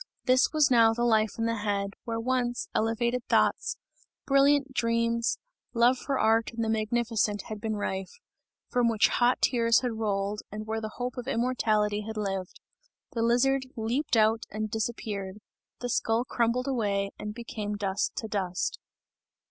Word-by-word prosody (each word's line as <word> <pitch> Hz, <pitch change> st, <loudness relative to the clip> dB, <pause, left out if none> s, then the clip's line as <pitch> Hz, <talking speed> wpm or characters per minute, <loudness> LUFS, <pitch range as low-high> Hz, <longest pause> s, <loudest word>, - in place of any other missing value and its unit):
This 255 Hz, 0 st, +4 dB
was 305 Hz, -4 st, +3 dB
now 225 Hz, -2 st, +5 dB
the 240 Hz, -, -1 dB
life 220 Hz, -3 st, +2 dB
in 225 Hz, -, -1 dB
the 230 Hz, 0 st, 0 dB
head, 200 Hz, -1 st, -1 dB
where 230 Hz, -1 st, -2 dB
once 245 Hz, 0 st, -1 dB
elevated 235 Hz, +2 st, 0 dB
thoughts, -, -, +2 dB, 0.5 s
brilliant 275 Hz, 0 st, +3 dB
dreams, 230 Hz, -1 st, +1 dB, 0.4 s
love 245 Hz, +2 st, +4 dB
for 275 Hz, -2 st, -2 dB
art 225 Hz, -1 st, +3 dB
and 230 Hz, 0 st, -2 dB
the 220 Hz, -, -1 dB
magnificent 220 Hz, -2 st, 0 dB
had 215 Hz, -1 st, -6 dB
been 220 Hz, -1 st, -2 dB
rife; 190 Hz, -2 st, -3 dB, 0.6 s
from 245 Hz, -1 st, +3 dB
which 225 Hz, -2 st, +3 dB
hot 245 Hz, +1 st, +2 dB
tears 230 Hz, -2 st, +4 dB
had 240 Hz, -3 st, -3 dB
rolled 205 Hz, -1 st, -1 dB
and 215 Hz, +1 st, -6 dB
where 220 Hz, 0 st, -3 dB
the 215 Hz, 0 st, -6 dB
hope 250 Hz, +1 st, -4 dB
of 250 Hz, 0 st, -5 dB
immortality 220 Hz, -5 st, +1 dB
had 220 Hz, +1 st, -6 dB
lived. 195 Hz, -3 st, -3 dB, 0.5 s
The 235 Hz, -5 st, -2 dB
lizard 260 Hz, +3 st, +2 dB
leaped 235 Hz, +4 st, 0 dB
out 220 Hz, +1 st, +3 dB
and 215 Hz, 0 st, -4 dB
disappeared; 210 Hz, -3 st, -3 dB, 0.4 s
the 245 Hz, -, -3 dB
skull 225 Hz, +1 st, +1 dB
crumbled 240 Hz, +2 st, 0 dB
away 200 Hz, -6 st, 0 dB
and 210 Hz, -, -4 dB
became 215 Hz, -3 st, -5 dB
dust 195 Hz, -1 st, -1 dB
to 220 Hz, -, -4 dB
dust. 190 Hz, -4 st, -2 dB
225 Hz, 160 wpm, -28 LUFS, 210-240 Hz, 0.6 s, now